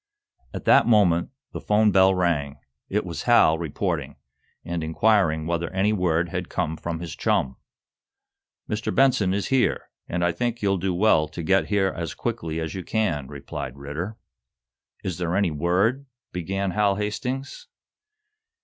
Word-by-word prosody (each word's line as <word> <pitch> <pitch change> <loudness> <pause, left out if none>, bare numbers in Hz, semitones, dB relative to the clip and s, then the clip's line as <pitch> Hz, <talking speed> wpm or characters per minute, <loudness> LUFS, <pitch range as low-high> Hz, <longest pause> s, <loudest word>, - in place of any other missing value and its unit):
At - - -7
that - - +5
moment 95 -7 +4 0.2
the - - -6
'phone 105 0 +3
bell 95 0 +5
rang. 75 -6 0 0.3
It - - 0
was - - -5
Hal, 80 +1 +5
reporting, 80 -4 -3 0.5
and 85 -1 -3
inquiring 80 -2 +2
whether 85 0 -1
any 95 +3 +1
word 85 -3 +1
had 90 -1 -4
come 85 -4 -2
from 80 0 -5
his 85 -4 -6
chum. 65 0 0 1.1
"Mr. 105 0 -2
Benson 125 -8 +3
is 100 +1 -1
here, 130 -2 +1 0.2
and 85 0 0
I 90 - +2
think 120 +6 -3
you'll 100 -1 +2
do 95 0 -1
well 90 -5 +3
to 80 +3 -7
get 95 +4 +2
here 100 -2 +1
as 85 -4 -4
quickly 80 0 -3
as 80 -1 -4
you 95 - -5
can," 85 - -1
replied 70 -2 -7
Ridder. 80 +10 -5 0.9
"Is 90 -2 -4
there 85 0 -1
any 100 -4 +2
word 95 - +1
" - - -68
began 95 +2 -2
Hal 100 +1 +2
Hastings. 125 - -4
90 Hz, 160 wpm, -24 LUFS, 80-105 Hz, 1.1 s, that